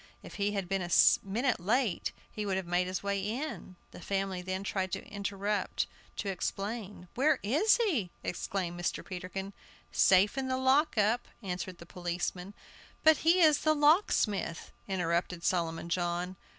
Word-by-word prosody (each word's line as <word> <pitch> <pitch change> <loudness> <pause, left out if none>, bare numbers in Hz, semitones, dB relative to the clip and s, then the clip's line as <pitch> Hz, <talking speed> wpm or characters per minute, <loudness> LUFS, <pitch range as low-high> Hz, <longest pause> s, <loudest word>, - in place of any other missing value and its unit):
If - - -10
I 200 0 +2
had 200 -3 -2
been 195 +1 -1
a 175 - -4 0.3
minute 235 +5 0
late 215 +2 0 0.2
he 215 - -4
would 195 -2 -1
have 190 - -3
made 175 +1 +1
his 185 +1 -3
way 200 0 0
in" 220 -1 -4 0.2
The - - -11
family 195 -1 -2
then 185 +1 -3
tried 190 -1 -2
to 195 - -3
interrupt 200 0 -2 0.3
to - - -4
explain 195 +1 -4
"Where 295 +5 +3
is 305 - +4
he?" 325 - 0
exclaimed 175 -1 -3
Mr. 175 - -2
Peterkin. 190 +1 -6 0.4
"Safe 195 +2 +4
in 265 - -2
the 260 0 0
lock 265 +2 +3
up," 215 +4 +2 0.2
answered 180 -1 -4
the 170 - -12
policeman. 180 +2 -4 0.5
"But 315 -1 +7
he 340 +3 +4
is 305 -3 +6
the 310 0 +2
locksmith!" 290 - +2 0.2
interrupted 175 -2 -1
Solomon 170 -2 0
John. 175 +1 -1
195 Hz, 160 wpm, -31 LUFS, 180-240 Hz, 0.5 s, But